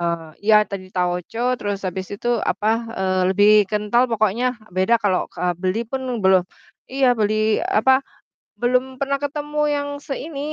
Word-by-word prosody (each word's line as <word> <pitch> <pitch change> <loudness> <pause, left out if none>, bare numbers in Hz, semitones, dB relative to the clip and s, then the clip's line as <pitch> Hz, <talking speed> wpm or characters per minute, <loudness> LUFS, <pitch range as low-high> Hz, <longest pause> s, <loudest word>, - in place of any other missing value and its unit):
Eee, 170 -2 -2 0.2
iya, 215 - +8
tan 195 -1 -5
tauco 180 +5 -2 0.2
terus 205 -1 -3
abis 185 +1 -5
itu - - -8 0.2
apa, 210 - -1 0.3
eee, 185 -1 0
lebih 205 +2 +4 0.2
kental 210 +3 +2
pokoknya, 220 +2 +1 0.3
beda 190 +5 +3
kalau 190 -3 +2
ke - - -16
eee, 180 -1 0
beli 185 +4 0
pun 265 -1 -3 0.2
beloh 190 -1 +5 0.5
iya 270 0 +1
beli 215 0 +1
apa, 260 +5 +3 0.6
belum 250 +1 +3 0.2
pernah 275 0 0
ketemu 295 +1 -3 0.2
yang 285 0 -3 0.2
seini, 280 +1 -5
215 Hz, 155 wpm, -21 LUFS, 185-260 Hz, 0.6 s, iya